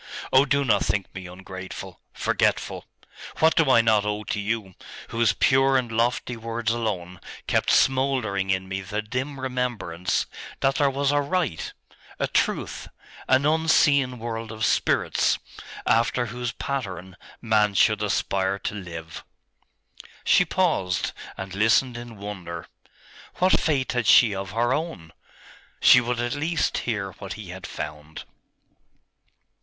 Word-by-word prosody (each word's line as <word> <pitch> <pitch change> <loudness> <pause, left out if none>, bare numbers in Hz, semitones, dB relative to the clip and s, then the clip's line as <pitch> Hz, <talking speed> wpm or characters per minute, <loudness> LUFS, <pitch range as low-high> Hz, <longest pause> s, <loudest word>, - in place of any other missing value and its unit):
Oh, 130 +2 +6
do 140 0 +1
not 115 - +3
think 95 0 -2
me 95 -1 -7
ungrateful, 95 +1 -9
forgetful! - - 0 0.5
What 160 +1 +4
do 160 -4 +3
I 120 -3 +6
not 110 -2 +3
owe 105 0 -2
to 105 0 -3
you, 105 -2 -3 0.4
whose 115 0 +2
pure 135 0 +3
and 120 -3 -2
lofty 120 +2 0
words 115 0 -2
alone 95 -6 -3 0.3
kept - - +1
smouldering 130 -8 +2
in 95 0 0
me 95 0 -3
the 105 +3 -4
dim 130 +5 -4
remembrance 125 -9 -2 0.4
that 135 +1 +2
there 140 -1 +3
was 140 +1 0
a 145 0 +2
Right, 145 - -2 0.5
a - - 0
Truth, - - -1 0.4
an 130 +2 +4
unseen 145 -4 +3
world 115 -1 -5
of 110 0 -2
spirits, - - +2 0.5
after 115 +2 +2
whose 120 +1 -4
pattern 95 -12 -5 0.2
man 105 -3 +2
should 105 +1 +3
aspire 95 -1 0
to 100 - -4
live?' 85 -5 -8 1.0
She 180 - +4
paused, 160 - 0 0.3
and 95 -1 -6
listened 110 +5 +3
in 120 -2 -8
wonder. 90 -5 -7 0.7
What 185 +1 +3
faith 140 -5 0
had 120 -3 -1
she 115 -3 +7
of 95 -1 -4
her 120 +5 +1
own? 145 - -4 0.7
She 125 - +7
would 120 0 -2
at 120 0 -1
least 160 +3 0
hear 100 -4 -2
what 100 - -6
he 105 -4 -9
had 90 +1 -7
found.... 75 +1 -7
115 Hz, 140 wpm, -25 LUFS, 95-130 Hz, 1.0 s, she